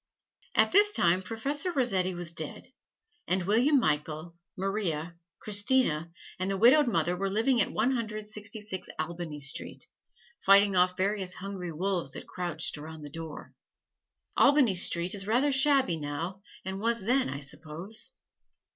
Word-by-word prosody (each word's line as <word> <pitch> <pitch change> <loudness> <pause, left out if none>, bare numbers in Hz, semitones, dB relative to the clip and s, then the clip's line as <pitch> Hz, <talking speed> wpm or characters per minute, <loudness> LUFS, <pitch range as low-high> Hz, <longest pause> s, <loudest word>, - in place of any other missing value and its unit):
At - - +4
this 415 +2 +6
time 175 - +3
Professor 275 - -2
Rossetti 195 - +1
was 175 -1 -5
dead, 160 - -7 0.5
and 185 -1 0
William 250 +9 +4
Michael, 155 -2 -2 0.2
Maria, 180 -4 -2 0.2
Christina 205 -6 +2 0.3
and 185 +1 -1
the 195 - -1
widowed 260 +7 +6
mother 175 -5 +1
were 195 +2 -2
living 230 +4 +2
at - - 0
One 230 +5 +1
Hundred 215 -4 -3
Sixty 210 0 -2
six 195 -3 -6
Albany 165 -1 -4
Street, 145 -1 -3 0.5
fighting 200 0 +5
off 180 0 +3
various 190 -1 -1
hungry 185 -2 -6
wolves 175 -4 -2
that - - -7
crouched 170 -4 -2
around 155 +1 -9
the 145 - -9
door. 160 -1 -8 0.8
Albany 275 -7 +5
Street 175 -1 +2
is 195 -1 -3
rather 255 +6 +2
shabby 270 - +3
now, 160 +6 -5 0.2
and 190 +1 -4
was 230 0 0
then, 250 - +2
I 140 +1 -5
suppose. 160 +8 -5
190 Hz, 145 wpm, -29 LUFS, 170-225 Hz, 0.8 s, this